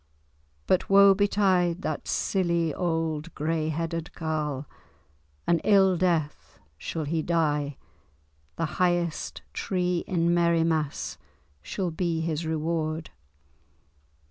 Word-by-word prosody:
But 185 Hz, -, +1 dB
woe 200 Hz, 0 st, +8 dB
betide 190 Hz, -3 st, +2 dB
that 155 Hz, -, -3 dB
silly 170 Hz, -4 st, 0 dB
old 165 Hz, -1 st, -2 dB
grey 155 Hz, +1 st, -1 dB
headed 165 Hz, +1 st, -3 dB
carle! 150 Hz, -3 st, -2 dB, 0.8 s
An 170 Hz, -1 st, +3 dB
ill 195 Hz, -2 st, +4 dB
death 170 Hz, -4 st, -1 dB, 0.2 s
shall 160 Hz, -, -3 dB
he 160 Hz, +2 st, -1 dB
die! 150 Hz, -4 st, 0 dB, 0.8 s
The -, -, -1 dB, 0.2 s
highest 175 Hz, -3 st, 0 dB
tree 180 Hz, -2 st, -1 dB
in 170 Hz, -1 st, +2 dB
Merriemass 165 Hz, -3 st, +1 dB, 0.4 s
shall 180 Hz, -, -3 dB
be 165 Hz, 0 st, -1 dB
his 160 Hz, 0 st, -2 dB
reward." 160 Hz, 0 st, -2 dB
165 Hz, 100 wpm, -27 LUFS, 155-175 Hz, 0.8 s, woe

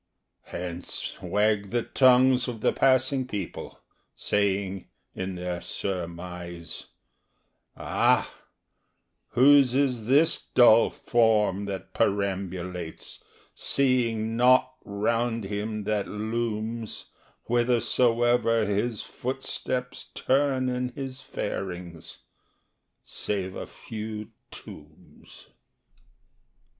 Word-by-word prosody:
Hence 90 Hz, 0 st, -5 dB
wag 105 Hz, -1 st, +1 dB
the 120 Hz, +1 st, 0 dB
tongues 130 Hz, 0 st, +4 dB
of 115 Hz, -3 st, -5 dB
the -, -, +2 dB
passing 130 Hz, 0 st, +2 dB
people, 100 Hz, -7 st, -6 dB, 0.4 s
saying 100 Hz, -2 st, -1 dB, 0.2 s
In 95 Hz, 0 st, -4 dB
their 90 Hz, -1 st, -4 dB
surmise, 85 Hz, -2 st, -5 dB, 0.9 s
"Ah—whose 135 Hz, 0 st, +1 dB
is 125 Hz, -5 st, +1 dB
this 150 Hz, +6 st, +4 dB
dull 115 Hz, -2 st, +7 dB
form 105 Hz, -4 st, +2 dB
that 95 Hz, -2 st, -6 dB
perambulates, 95 Hz, -4 st, -2 dB, 0.3 s
seeing 115 Hz, -5 st, +1 dB
nought 130 Hz, +2 st, +4 dB
Round 115 Hz, +3 st, -1 dB
him 105 Hz, +2 st, -3 dB
that 105 Hz, -1 st, -1 dB
looms 110 Hz, +1 st, -3 dB, 0.3 s
Whithersoever 120 Hz, -1 st, +2 dB
his 105 Hz, +2 st, -1 dB
footsteps 130 Hz, -1 st, -3 dB
turn 135 Hz, -1 st, +1 dB
in 125 Hz, 0 st, -1 dB
his 135 Hz, -1 st, -6 dB
farings, 90 Hz, -9 st, -6 dB, 0.8 s
Save 95 Hz, -3 st, -3 dB
a -, -, -6 dB
few 110 Hz, -1 st, -7 dB, 0.2 s
tombs?" -, -, -14 dB
110 Hz, 80 wpm, -27 LUFS, 100-125 Hz, 0.9 s, dull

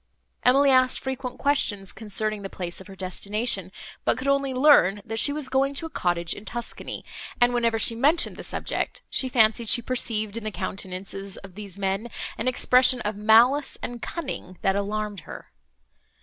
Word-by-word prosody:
Emily 275 Hz, +2 st, +4 dB
asked 255 Hz, -1 st, +4 dB
frequent 265 Hz, -1 st, -5 dB
questions, 210 Hz, -9 st, 0 dB
concerning 215 Hz, 0 st, -2 dB
the 195 Hz, -, -6 dB
place 175 Hz, -1 st, -5 dB
of 190 Hz, -, -13 dB
her 195 Hz, -, -11 dB
destination, 195 Hz, +1 st, -1 dB, 0.3 s
but -, -, +1 dB
could 255 Hz, +2 st, -5 dB
only 275 Hz, -1 st, +1 dB
learn, 255 Hz, -, +4 dB
that 225 Hz, 0 st, -1 dB
she 285 Hz, -, +6 dB
was 295 Hz, -2 st, -4 dB
going 275 Hz, +1 st, 0 dB
to 325 Hz, -, -3 dB
a 325 Hz, -, -8 dB
cottage 175 Hz, -1 st, -1 dB
in 205 Hz, -, -10 dB
Tuscany; 235 Hz, +2 st, -5 dB, 0.3 s
and, 245 Hz, 0 st, +4 dB
whenever 235 Hz, -2 st, +1 dB
she 230 Hz, -, +4 dB
mentioned 290 Hz, +9 st, +2 dB
the -, -, -9 dB
subject, -, -, -4 dB
she 260 Hz, -, +2 dB
fancied 225 Hz, -2 st, +2 dB
she -, -, +5 dB
perceived, 225 Hz, -4 st, -1 dB
in 230 Hz, -, -6 dB
the 215 Hz, -, -2 dB
countenances 195 Hz, 0 st, -5 dB
of 195 Hz, -2 st, -12 dB
these 200 Hz, -1 st, -9 dB
men, 195 Hz, +4 st, -2 dB, 0.3 s
an 230 Hz, -, -4 dB
expression 255 Hz, 0 st, +4 dB
of 210 Hz, 0 st, -3 dB
malice 230 Hz, +7 st, +4 dB
and 240 Hz, -1 st, -5 dB
cunning, 270 Hz, -, -6 dB
that 195 Hz, -, +2 dB
alarmed 205 Hz, 0 st, -3 dB
her. -, -, -11 dB
225 Hz, 175 wpm, -25 LUFS, 200-255 Hz, 0.3 s, she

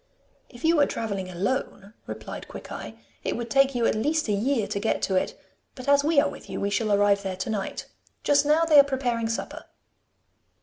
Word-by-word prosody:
'If 240 Hz, 0 st, -14 dB
you 330 Hz, 0 st, +4 dB
were 285 Hz, -, +4 dB
travelling 200 Hz, -4 st, -3 dB
alone,' 200 Hz, +1 st, -3 dB
replied -, -, -7 dB
Quickeye, -, -, -8 dB, 0.3 s
'it -, -, -2 dB
would 235 Hz, -1 st, -5 dB
take 275 Hz, -1 st, +4 dB
you 235 Hz, -1 st, +1 dB
at -, -, +3 dB
least 300 Hz, +8 st, 0 dB
a 210 Hz, -, +1 dB
year 225 Hz, +2 st, +1 dB
to 200 Hz, -, -3 dB
get 220 Hz, -, 0 dB
to 190 Hz, -, +1 dB
it; 185 Hz, -, -1 dB, 0.4 s
but 255 Hz, 0 st, -9 dB
as 285 Hz, 0 st, +5 dB
we 305 Hz, 0 st, +4 dB
are 290 Hz, -, +3 dB
with -, -, -9 dB
you, -, -, -4 dB
we 200 Hz, -, -1 dB
shall 215 Hz, +1 st, 0 dB
arrive 200 Hz, 0 st, +3 dB
there 190 Hz, -2 st, -4 dB
to 190 Hz, -, -4 dB
night. 200 Hz, -3 st, -3 dB, 0.4 s
Just 290 Hz, 0 st, +4 dB
now 305 Hz, +3 st, +3 dB
they 305 Hz, -3 st, +7 dB
are -, -, +9 dB
preparing 245 Hz, -5 st, -1 dB
supper. 230 Hz, -, -4 dB
235 Hz, 210 wpm, -26 LUFS, 200-280 Hz, 0.4 s, are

